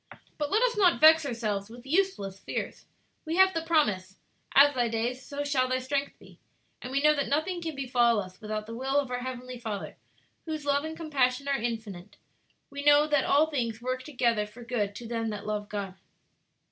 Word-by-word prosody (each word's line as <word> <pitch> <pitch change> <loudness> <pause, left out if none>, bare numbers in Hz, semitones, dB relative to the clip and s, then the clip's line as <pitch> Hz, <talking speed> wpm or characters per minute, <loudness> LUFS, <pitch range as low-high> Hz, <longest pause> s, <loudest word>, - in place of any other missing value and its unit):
"But 295 -1 -1
let 430 +7 +2
us - - +2
not 375 -5 +4
vex 315 -1 +7
ourselves 215 -5 -3
with 240 +2 -12
useless 275 - 0
fears. - - -5 0.4
We 320 0 -3
have 380 +1 +5
the 330 - -1
promise, 210 - 0 0.4
'As 285 +1 +7
thy 245 -2 +1
days, 235 +3 -2
so 285 +2 -5
shall 275 -3 +1
thy 255 - +1
strength 275 +2 -2
be.' - - -18 0.4
And 250 - -7
we 275 +1 0
know 300 0 +6
that 285 -2 -1
nothing 330 +5 -1
can 320 -3 -4
befall 245 -4 +2
us 185 -2 -8
without 215 0 -4
the 225 - -8
will 265 +4 -1
of 280 -3 0
our 250 - -1
Heavenly 255 -1 -6
Father, 220 -4 -5 0.5
whose 310 -2 -4
love 285 0 +2
and 320 0 -6
compassion 280 -4 0
are 280 - +2
infinite. 215 -5 -5 0.5
'We 280 0 -6
know 290 0 +6
that 295 -2 +1
all 295 +2 +4
things 230 -6 -2
work 255 +1 -3
together 240 -6 0
for 230 +4 -13
good 215 -4 -2
to 235 +2 -8
them 225 -1 -2
that 210 -1 -6
love 210 -1 -3
God.'" 200 -3 -4
255 Hz, 200 wpm, -28 LUFS, 225-290 Hz, 0.5 s, vex